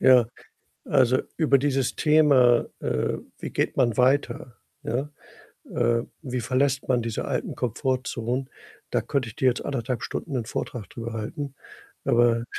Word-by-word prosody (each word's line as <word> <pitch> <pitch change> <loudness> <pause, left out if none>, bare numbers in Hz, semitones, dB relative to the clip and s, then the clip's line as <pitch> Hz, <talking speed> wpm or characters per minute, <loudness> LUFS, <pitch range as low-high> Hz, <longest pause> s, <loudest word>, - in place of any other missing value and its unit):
Ja. 125 -2 +7 0.6
Also 130 -3 +4 0.2
über 145 -4 +4
dieses 135 -2 0
Thema, 145 -6 +5
äh, 65 - -1 0.2
wie - - -5
geht - - -1
man 120 -4 +2
weiter, 125 -2 +1 0.3
ja? 145 0 -2 0.6
Äh, 115 0 +2 0.2
wie 125 -3 -3
verlässt 135 +2 +1
man 125 -2 +2
diese 115 -1 -3
alten - - -2
Komfortzonen, 125 +1 -2 0.4
da - - +1
könnte 135 -5 -1
ich 105 - -13
dir 130 - +3
jetzt 125 - -2
1,5 125 -2 -2
Stunden 150 - -4
'nen 120 -4 -1
Vortrag 120 -2 -5
drüber 115 -1 -6
halten. 130 +6 -5 0.5
Aber 120 -1 +3
125 Hz, 145 wpm, -25 LUFS, 120-135 Hz, 0.6 s, Ja